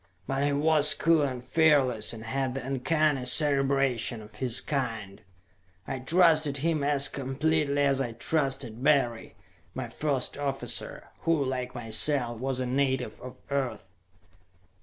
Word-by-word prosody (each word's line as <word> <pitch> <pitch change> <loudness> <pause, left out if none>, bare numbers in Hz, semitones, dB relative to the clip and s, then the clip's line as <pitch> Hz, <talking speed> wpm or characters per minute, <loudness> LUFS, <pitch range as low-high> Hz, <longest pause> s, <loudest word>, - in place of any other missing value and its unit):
But 135 +4 -2
he 145 - +1
was 150 +1 +4
cool 165 -1 +3
and 130 -3 -3
fearless 145 -3 +2
and 115 -1 -9
had 130 +2 -2
the 135 -2 -5
uncanny 140 +1 0
cerebration 135 -3 +2
of 105 +1 -13
his 125 -2 +1
kind; 115 -8 -4 0.7
I 130 - -4
trusted 155 0 +3
him 155 0 -1
as 140 -1 +3
completely 145 +1 -1
as 135 -1 +2
I 120 -3 -3
trusted 135 -2 -2
Barry, 135 -6 +1 0.4
my - - -5
first 140 -2 -2
officer, 135 -1 -4
who, 165 -4 0
like 130 -1 -4
myself, 120 +1 +1
was 130 0 -3
a 130 - -1
native 130 0 -1
of 125 0 -11
Earth. 120 -9 -3
135 Hz, 140 wpm, -27 LUFS, 125-145 Hz, 0.7 s, was